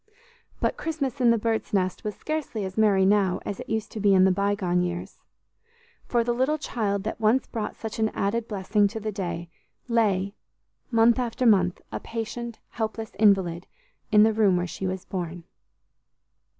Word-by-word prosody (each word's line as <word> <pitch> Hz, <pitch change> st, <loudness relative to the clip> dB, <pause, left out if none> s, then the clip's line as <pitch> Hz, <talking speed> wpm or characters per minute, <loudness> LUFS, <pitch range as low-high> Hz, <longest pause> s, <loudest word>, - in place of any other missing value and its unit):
But -, -, 0 dB
Christmas 280 Hz, -5 st, -3 dB
in 240 Hz, -, +5 dB
the 230 Hz, -, +4 dB
Birds' 225 Hz, 0 st, -2 dB
Nest 185 Hz, -2 st, 0 dB
was 210 Hz, -1 st, -3 dB
scarcely 300 Hz, -9 st, -3 dB
as 190 Hz, 0 st, -6 dB
merry 205 Hz, -3 st, +4 dB
now 195 Hz, -2 st, +3 dB
as 200 Hz, -, -4 dB
it -, -, -8 dB
used 220 Hz, -1 st, -2 dB
to 220 Hz, -, -6 dB
be 200 Hz, -1 st, +4 dB
in 185 Hz, -, +6 dB
the 190 Hz, -, +5 dB
bygone 195 Hz, -2 st, +1 dB
years, 175 Hz, 0 st, -4 dB, 0.9 s
for 235 Hz, -1 st, +2 dB
the 240 Hz, +1 st, 0 dB
little 260 Hz, +5 st, +1 dB
child 205 Hz, -9 st, -2 dB
that 220 Hz, +1 st, -4 dB
once 225 Hz, +4 st, +3 dB
brought 215 Hz, -2 st, -4 dB
such 220 Hz, 0 st, -6 dB
an 220 Hz, 0 st, +2 dB
added 220 Hz, +4 st, -1 dB
blessing 205 Hz, 0 st, +1 dB
to 220 Hz, +2 st, -5 dB
the 215 Hz, 0 st, -3 dB
day, 175 Hz, -4 st, -4 dB, 0.4 s
lay, 200 Hz, -5 st, +1 dB, 0.6 s
month 230 Hz, +1 st, +4 dB
after 250 Hz, +1 st, -1 dB
month, 185 Hz, -5 st, +3 dB
a -, -, -3 dB
patient, 235 Hz, +1 st, -5 dB
helpless 220 Hz, -1 st, -4 dB
invalid, 190 Hz, -5 st, +3 dB, 0.4 s
in 210 Hz, -1 st, +7 dB
the 220 Hz, 0 st, +4 dB
room 205 Hz, -4 st, +3 dB
where 175 Hz, -, 0 dB
she 190 Hz, +2 st, -4 dB
was 185 Hz, 0 st, -4 dB
born. 175 Hz, -2 st, -5 dB
210 Hz, 175 wpm, -26 LUFS, 190-230 Hz, 0.9 s, in